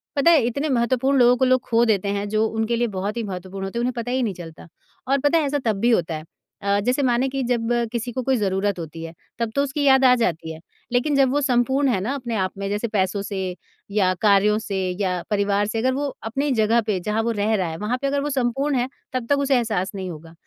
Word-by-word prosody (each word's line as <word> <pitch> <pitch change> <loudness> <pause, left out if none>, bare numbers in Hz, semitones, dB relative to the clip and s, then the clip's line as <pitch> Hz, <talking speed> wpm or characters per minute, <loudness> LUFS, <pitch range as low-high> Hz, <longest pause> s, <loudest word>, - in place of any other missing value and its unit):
पता 290 +4 +5
है 315 - +5
इतने 280 +6 -1
महत्वपूर्ण 260 +2 +1
लोगों 245 0 +6
को 260 - +2
लोग 255 0 +3
ख़ो 230 0 +4
देते 205 -3 +1
हैं 200 0 -2
जो 215 +1 +1
उनके 225 +1 -1
लिए 240 0 +1
बहुत 200 +5 -3
ही 230 - -1
महत्वपूर्ण 190 0 -6
होते 195 - -5
हैं - - 0
उन्हें 250 +1 0
पता 235 +1 -3
ही 260 +1 +1
नहीं 210 - -1
चलता 165 -2 -11 0.4
और 275 +1 +2
पता 290 +4 +3
है 310 - +1
ऐसा 285 +1 0
तब 220 - +2
भी 235 +3 +2
होता 170 -7 +1
है। 155 - -6 0.4
अ, 200 0 +1
जैसे 255 +3 +1
माने 245 +1 +2
कि 270 0 -3
जब 235 -2 0 0.2
किसी 240 0 -3
को 255 +2 -3
कोई 265 - +3
ज़रूरत 195 -1 0
होती 165 0 -7
है 165 - -7 0.3
तब 230 -1 -1
तो 280 - +3
उसकी 285 +1 -2
याद 265 -1 +5
आ 250 - +7
जाती 165 -5 -1
है 160 - -11 0.3
लेकिन 250 +4 +1
जब 270 -2 +4
वो 290 - +1
संपूर्ण 265 +1 +2
है 200 -7 +1
ना 245 +7 -2
अपने 240 -4 -4
आप 185 - -2
में 200 0 -3
जैसे 210 +3 -1
पैसों 200 -1 0
से 200 -1 -5 0.5
या 195 -3 +2
कार्यों 210 0 +4
से 200 -3 -4 0.2
या 180 -2 0
परिवार 200 0 +1
से 220 - -3
अगर 260 +2 +1
वो 285 +1 -1 0.2
अपनी 280 +5 -1
जगह 225 0 +3
पे 195 -4 0
जहाँ 210 +4 -1
वो 235 - 0
रह 215 +2 +1
रहा 185 -4 0
है 160 - -6
वहाँ 210 +6 -2
पे 275 - 0
अगर 280 0 0
वो 295 - -2
संपूर्ण 270 +2 0
है 245 +1 0 0.3
तब 255 -2 -2
तक 285 - +4
उसे 280 -1 +2
एहसास 215 -6 0
नहीं 190 -1 -4
होगा। 165 0 -10
230 Hz, 260 wpm, -22 LUFS, 200-260 Hz, 0.5 s, आ